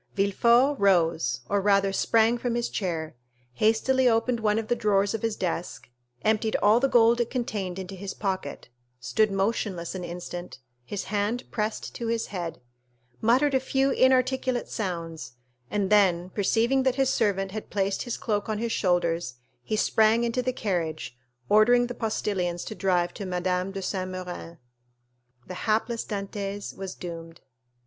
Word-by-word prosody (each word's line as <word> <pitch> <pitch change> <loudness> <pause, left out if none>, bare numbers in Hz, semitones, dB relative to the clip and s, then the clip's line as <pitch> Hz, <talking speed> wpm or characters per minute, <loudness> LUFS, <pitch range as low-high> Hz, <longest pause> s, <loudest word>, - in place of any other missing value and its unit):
Villefort 235 +8 +3
rose, 165 -9 +2
or 200 0 +1
rather 195 -1 +3
sprang, 230 +3 +3
from 240 -1 -1
his 240 0 -1
chair, 165 -5 -3 0.4
hastily 245 - +3
opened 230 +1 +1
one 215 -1 +1
of 225 -1 -2
the 240 - +1
drawers 205 -3 +1
of 225 - -3
his 225 -2 -1
desk, 175 -6 -4 0.3
emptied 220 0 +1
all 210 +3 +4
the 270 +2 +2
gold 235 0 +5
it 235 - -1
contained 205 -8 -3
into 190 0 -6
his 195 +1 -6
pocket, 190 -7 -4 0.3
stood 125 - +1
motionless 195 -3 -1
an 185 -1 -5
instant, 175 0 -7 0.3
his 195 +10 -4
hand 210 +4 -1
pressed 215 -1 -3
to 235 - -4
his 230 0 0
head, 175 -3 -4 0.6
muttered 260 +6 +3
a 265 - +4
few 270 +1 +1
inarticulate 260 -1 +2
sounds, 165 - -5 0.4
and 200 +2 -1
then, 185 -3 +3
perceiving 230 +7 +2
that 260 -1 +1
his 270 -1 +2
servant 195 -2 0
had 215 +1 -6
placed 195 -1 -1
his 240 - -3
cloak 210 -1 -2
on 215 - -1
his 230 +1 -2
shoulders, 170 - 0 0.3
he 215 - -2
sprang 220 +2 +3
into 235 +2 0
the 255 +1 -1
carriage, 170 - -3 0.3
ordering 240 +4 +5
the 245 - -5
postilions 195 -6 -2
to - - -5
drive 180 -4 +1
to - - -10
M. 180 -2 -3 0.3
de 195 0 -5
Saint 185 -1 -2
Méran's. 180 -2 -7 0.9
The - - -7 0.2
hapless 225 +2 +1
Dantès 200 0 -5
was 190 -1 -6
doomed. 165 -2 -8
205 Hz, 160 wpm, -26 LUFS, 185-230 Hz, 0.9 s, gold